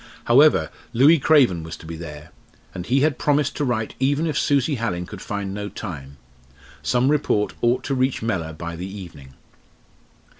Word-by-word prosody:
However, 140 +6 +4 0.2
Louis 145 +7 +6
Craven 135 - +4
was 80 0 -8
to - - -14
be 80 +1 -6
there. 75 -2 -9 0.4
And 90 0 -6
he 135 +3 +2
had 150 -2 +1
promised 145 -1 +1
to - - 0
write 115 -5 -1
even 140 +4 +1
if 155 -3 -2
Susie 145 0 +2
Hallin 90 -7 -2
could 95 +1 -10
find 100 -2 -4
no 105 0 -4
time. 70 -11 -8 0.6
Some 125 +2 +2
report 140 -8 +1
ought 120 +2 +2
to 140 - -2
reach 130 -2 0
Mellor 85 -8 -2
by 85 +2 -6
the 90 +3 -6
evening. 85 -9 -11
110 Hz, 175 wpm, -22 LUFS, 85-140 Hz, 0.6 s, Louis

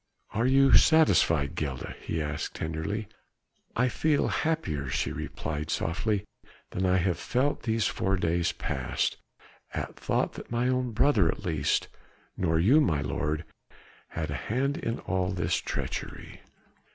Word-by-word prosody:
"Are 115 +3 +2
you 135 +1 +5
satisfied, 85 - +5
Gilda?" 65 -4 -4
he 80 -1 -2
asked 75 0 -4
tenderly. 80 +7 -3 0.7
"I 125 +2 +3
feel 150 +4 +1
happier," 80 - -1
she - - -1
replied 75 0 -4
softly, 100 +4 0 0.5
"than 95 +1 0
I 90 0 +4
have 90 -1 +1
felt 130 +9 0
these 110 -1 0
four 95 +1 0
days 85 -1 +1
past, 65 -2 -2 0.6
at - - -4
thought - - 0
that - - -9
my 120 +1 +1
own 125 -1 +1
brother 110 - +4
at - - -3
least 75 -5 +1 0.5
nor 80 -3 +1
you, 125 - +6
my 80 - +2
lord 75 +3 -2 0.6
had - - -4
a - - -5
hand 135 +5 +1
in 115 +1 -2
all 95 -1 -1
this 85 -2 0
treachery." - - -5
95 Hz, 140 wpm, -28 LUFS, 80-125 Hz, 0.7 s, you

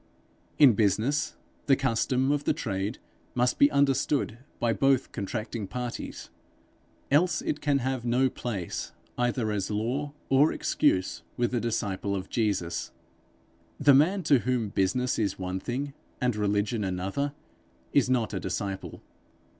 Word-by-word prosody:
In 140 -5 +8
business, 110 +8 +1 0.3
the 135 - +6
custom 130 +1 +1
of 145 0 0
the - - +2
trade 100 +1 -2 0.4
must 125 0 +1
be 140 - +7
understood 135 -3 +1 0.2
by 115 -1 +2
both 135 +1 +2
contracting 110 +1 -4
parties, 125 +3 -6 0.8
else 155 +2 +3
it 150 - -2
can 145 -2 +2
have 130 -1 -2
no 125 +2 +3
place, 105 -8 -4 0.2
either 120 -2 0
as 100 -2 -2
law 125 +8 -2
or 135 +4 +4
excuse, 95 -1 +1 0.2
with 120 -1 +1
the 125 - +1
disciple 100 -4 -1
of 95 0 -5
Jesus. 90 -7 -1 0.9
The 140 0 +6
man 175 +8 +4
to 145 -4 +5
whom 120 -3 -1
business 110 +7 0
is 100 -3 0
one 95 0 -3
thing 135 +7 -3 0.3
and 125 -3 +1
religion 105 +1 0
another, 95 +10 -2 0.6
is 140 -3 +4
not 120 -5 +1
a 95 - -1
disciple. 95 +1 -4
120 Hz, 140 wpm, -28 LUFS, 100-135 Hz, 0.9 s, In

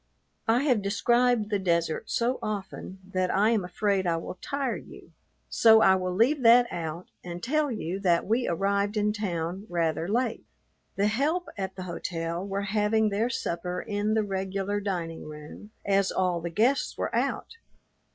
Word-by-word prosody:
I 235 +4 +3
have 250 -8 +2
described 235 +2 +2
the 205 - +1
desert 170 -3 0
so 240 +2 0
often 195 -2 -5 0.2
that 185 -1 +1
I 210 +5 +3
am 220 -5 +1
afraid 190 +1 0
I 165 -1 +1
will 170 +2 -7
tire 275 -3 -2
you, - - -12 0.4
so 220 -1 +6
I 190 - +6
will 185 -1 -1
leave 255 +8 +3
that 240 +1 +7
out 165 +1 -5
and 175 0 -7
tell 300 +3 +1
you 190 -4 -3
that 175 -3 +2
we 235 +4 +1
arrived 200 +4 0
in 210 0 +1
town 185 -1 -3
rather 165 -1 0
late. 230 +3 -1 0.5
The 200 - +1
help 290 +12 0
at 190 -1 -4
the 185 - -6
hotel 170 -1 -4
were 200 0 -3
having 210 +1 +2
their 210 +4 0
supper 180 -5 -3
in 210 +2 -1
the 220 - +2
regular 195 +1 -2
dining 175 -5 -4
room, 150 +7 -10 0.2
as 195 -1 +2
all 180 -2 0
the 170 - -3
guests 235 +10 +1
were - - -2
out. 460 - -2
200 Hz, 170 wpm, -27 LUFS, 180-220 Hz, 0.5 s, that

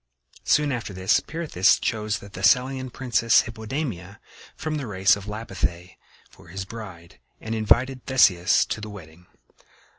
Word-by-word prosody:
Soon 150 -1 +3
after 115 -5 -4
this 95 0 +2
Pirithous 155 - +1
chose 110 -2 -2
the 100 - -12
Thessalian 125 +7 +1
princess, 120 -3 +2
Hippodamia, 110 - -5 0.4
from 155 -1 -3
the 140 -4 -5
race 95 -1 +3
of 100 -1 -9
Lapithæ, 95 -4 -4 0.3
for - - -19
his 95 +3 -6
bride, 95 -6 -10 0.2
and 110 - -5
invited 120 +4 +1
Theseus 100 -9 +4
to 110 - -4
the 105 - -7
wedding. 90 -3 -13
105 Hz, 140 wpm, -24 LUFS, 95-125 Hz, 0.4 s, Theseus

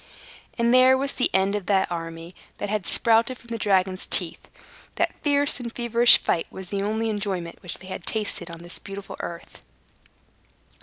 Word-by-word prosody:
And 235 0 +2
there 255 +1 +6
was 275 +1 -2
the 255 - 0
end 190 +1 +2
of 205 -3 -3
the 195 -2 +2
army 165 -1 -6 0.2
that 205 - -4
had 210 -3 -1
sprouted 230 +2 +3
from 235 - -17
the 230 -1 -4
dragon's 190 -2 +1
teeth. - - -1 0.5
That - - 0
fierce 285 -1 +2
and 235 -1 -5
feverish 235 0 +5
fight 165 - -1
was 190 -1 -9
the 200 -1 -2
only 220 +3 -1
enjoyment 200 -5 -4
which 180 - -3
they 185 - -14
had 185 - -7
tasted 205 -5 -2
on 170 0 -10
this 175 - -7
beautiful 195 0 -8
earth. 170 0 -8
205 Hz, 175 wpm, -24 LUFS, 185-235 Hz, 0.5 s, there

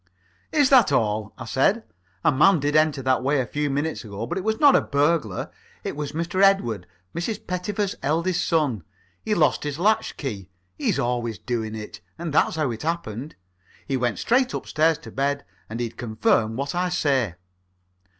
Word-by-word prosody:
"Is 285 -3 +3
that 245 - +6
all?" 110 -4 +1
I 130 - -7
said. 190 - +2 0.4
"A - - +5
man 155 +6 +5
did 145 +1 0
enter 155 -3 +3
that 130 0 +2
way 140 +2 +1
a 130 - 0
few 145 +3 -2
minutes 145 +2 -2
ago, 105 0 -5
but - - -4
it 190 - -3
was 220 +1 0
not 285 -2 +7
a - - +5
burglar. 145 - 0 0.3
It - - -4
was 150 0 -5
Master 170 +3 -1
Edward, 120 - +3 0.3
Mrs. 175 +6 -3
Pettifer's 190 +2 -2
eldest 165 +6 0
son. 145 - +1 0.4
He'd 215 -1 0
lost 165 - +2
his 145 -1 -3
latch 210 +6 +1
key 100 -10 -5 0.3
he's - - 0
always 120 -2 -1
doing 110 -3 -3
it 105 -1 -8 0.2
and 165 -3 -4
that's - - +3
how 155 -5 0
it 115 - -6
happened. 150 -5 -4 0.5
He 135 - 0
went 120 -4 0
straight 255 +2 +2
upstairs 160 0 +1
to 160 - -12
bed, 140 +1 -1 0.2
or 110 - -6
he'd 120 -1 -4
confirm 110 -1 +1
what 140 +3 -3
I 180 +1 0
say." 135 - +1
145 Hz, 180 wpm, -24 LUFS, 120-170 Hz, 0.5 s, not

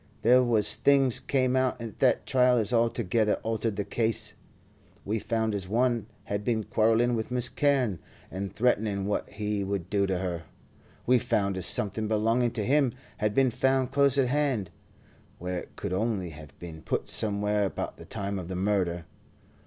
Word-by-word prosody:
There 125 +3 +6
was 115 -4 +4
things 135 -3 +3
came 130 -2 0
out 130 -1 +1
at 115 -3 -8
the - - +4
trial 125 -1 +3
as 115 +1 0
altogether 115 -2 +1
altered 110 -1 -2
the 105 - -2
case. 110 0 -1 0.7
We 110 +2 -1
found 110 0 -1
as 100 -3 -3
one 120 -1 +1 0.2
had 100 0 -3
been 110 -1 0
quarrelling 115 +3 +2
with 110 -2 -2
Miss 125 0 +1
Carne, 130 - +1 0.3
and 95 +1 -4
threatening 105 -3 0
what 105 - -2
he 105 0 -3
would 95 -3 -4
do 100 -1 +2
to 95 -1 -1
her. 90 -3 -4 0.6
We 125 0 +4
found 100 -3 0
as 95 -1 0
something 110 +1 +1
belonging 115 +3 +1
to 105 - -2
him 135 -1 +2 0.2
had 105 -1 -1
been 135 -2 +3
found 130 +1 +1
close 140 -1 +5
at 130 -3 +2
hand, 135 - 0 0.7
where 90 +1 -4
it - - -13
could - - -4
only 95 -3 -1
have 75 -2 -13
been 80 -2 -9
put - - -2
somewhere 105 -1 0
about 95 - -4
the - - -12
time 100 0 -4
of 90 - -7
the 95 - -5
murder. 90 -3 -1
110 Hz, 175 wpm, -27 LUFS, 100-125 Hz, 0.7 s, There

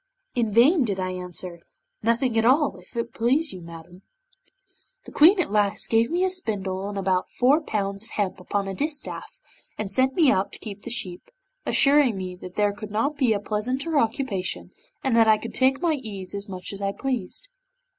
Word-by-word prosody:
In 230 -3 0
vain 265 - +5
did 200 -5 -2
I 185 0 -1
answer 180 -1 -6 0.4
'"Nothing 230 +2 +1
at 225 - +3
all, 275 +5 +3
if - - -14
it 235 0 -3
please 270 +7 +1
you, 185 - -8
madam." 170 +2 -12 1.0
'The - - -11
Queen 355 +7 +6
at 330 - 0
last 205 -1 +1
gave 225 +1 +4
me 350 +2 +1
a 375 - +3
spindle 200 - -3
and 205 - -5
about 185 -1 0
four 275 +6 +3
pounds 200 -7 -2
of 225 - -13
hemp 195 -3 -2
upon 195 +2 -2
a 195 - -3
distaff, 295 +7 -4 0.4
and 210 -2 -2
sent 260 +5 +3
me 310 -6 +5
out 190 -3 0
to - - -4
keep 205 -2 -8
the 235 - -7
sheep, 185 -7 -4 0.4
assuring 275 -6 +4
me 185 -1 -5
that 180 0 -10
there 205 -1 +2
could 205 +1 -8
not 225 +8 0
be 260 -5 +2
a 210 - +2
pleasanter 255 +10 -1
occupation, 225 -6 -2 0.3
and 265 -4 +1
that 225 -1 +5
I 215 -1 +6
could 230 - -7
take 265 +2 +2
my 335 -2 +3
ease 205 -10 -6
as 200 +1 -5
much 185 0 -5
as 200 - -7
I 195 0 -1
pleased. 270 - -4
220 Hz, 200 wpm, -25 LUFS, 195-265 Hz, 1.0 s, Queen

